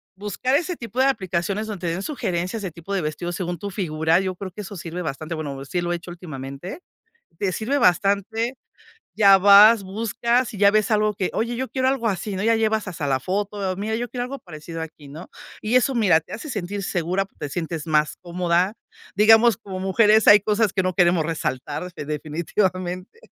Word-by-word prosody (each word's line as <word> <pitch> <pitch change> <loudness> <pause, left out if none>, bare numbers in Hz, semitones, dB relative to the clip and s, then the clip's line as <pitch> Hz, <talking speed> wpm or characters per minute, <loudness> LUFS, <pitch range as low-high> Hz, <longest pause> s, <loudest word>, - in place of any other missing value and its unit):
buscar 210 +7 -1
ese 345 +4 0
tipo 235 -3 -6
de 260 - +5
aplicaciones 195 -4 -1
donde 190 -5 -5
te 165 - 0
den 190 +3 -4
sugerencias 210 - -3
de 190 - -4
tipo 170 +4 -8
de 190 - 0
vestidos 170 +3 -4
según 175 -1 -3
tu 200 - -5
figura, 160 -3 +1
yo 190 -1 -2
creo 190 +1 -7
que 210 - -8
eso 200 0 -8
sirve 170 0 -6
bastante. 155 +2 -5
Bueno, 140 -3 -5
sí 175 +6 -2
lo 175 0 -2
he - - -1
hecho 170 +1 -12
últimamente, 155 - -8 0.6
te 195 -2 0
sirve 240 +9 -1
bastante. 200 +6 +1 0.6
Ya 200 -2 +7
vas, 205 +2 +7
buscas 230 +4 0
y - - -7
ya 200 0 +5
ves 215 0 +2
algo 215 -1 +2
que 190 -2 -2
oye: 235 +2 -1
"Yo 260 +2 -3
quiero 260 -1 -1
algo 260 -3 +1
así", 200 0 -3
¿no? 190 - -3
Ya 225 +1 +3
llevas 220 -1 0
hasta 165 -5 -4
la 135 -2 +1
foto. 195 +3 -2
"Mira, 215 +3 -2
yo 240 +2 -2
quiero 245 -1 -3
algo 275 +2 -7
parecido 165 0 -8
aquí", 155 -2 -10
¿no? 155 +6 -10 0.3
Y 220 +4 +1
eso 260 +2 +3
mira, 200 -9 +4
te 160 - -15
hace 305 - -6
sentir 200 -3 -4
segura, 180 +1 -1
p 195 - -22
te 145 - -4
sientes 165 +1 -4
más 150 -1 +1
cómoda. 175 +2 0 0.4
Digamos, 225 +1 +6
como 195 -3 -8
mujeres 210 +3 +4
hay 210 - +9
cosas 210 0 +1
que 190 - +1
no 185 0 -1
queremos 175 -2 +3
resaltar 150 0 -3
definitivamente, 175 - -3
190 Hz, 205 wpm, -23 LUFS, 170-215 Hz, 0.6 s, hay